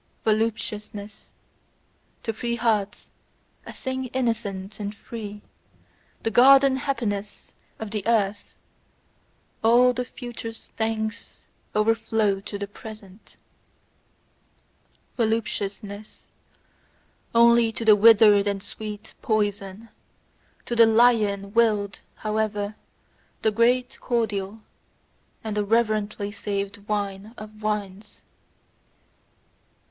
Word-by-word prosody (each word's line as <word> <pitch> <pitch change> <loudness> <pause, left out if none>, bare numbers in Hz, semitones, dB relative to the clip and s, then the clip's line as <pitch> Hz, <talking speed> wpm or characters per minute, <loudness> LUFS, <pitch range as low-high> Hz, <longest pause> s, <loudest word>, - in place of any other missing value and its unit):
Voluptuousness: 215 -2 -2 0.9
to 225 - -2
free 235 +2 -2
hearts, 215 -4 -1 0.6
a - - -6
thing 260 -1 -4
innocent 225 -6 -3
and 205 0 -4
free, 210 -1 -8 0.8
the 225 - 0
garden 270 +3 +7
happiness 215 -7 -3 0.2
of 220 -2 -6
the 215 -1 -2
earth, 205 -3 0 1.1
all 245 +2 +5
the 250 +1 -2
future's 240 -2 -9
thanks 220 -1 -3 0.3
overflow 220 -2 +2
to 200 +1 -6
the 200 - -3
present. 205 -1 -13 1.8
Voluptuousness: 215 -2 -3 1.1
only 235 0 +6
to 225 +1 -5
the 215 -1 +8
withered 210 -1 +6
a 200 -1 0
sweet 210 +1 -7
poison; 205 0 -1 0.8
to 240 - -2
the 230 -1 +7
lion 215 -4 +3
willed, 210 -4 +2 0.2
however, 215 -1 -2 0.7
the 220 - +3
great 245 +3 +2
cordial, 220 -3 -2 0.8
and 215 -2 -3
the 210 - +1
reverently 215 -1 0
saved 200 -1 -3
wine 205 +1 -3
of 215 0 -11
wines. 210 -1 -4
215 Hz, 90 wpm, -25 LUFS, 205-230 Hz, 1.8 s, the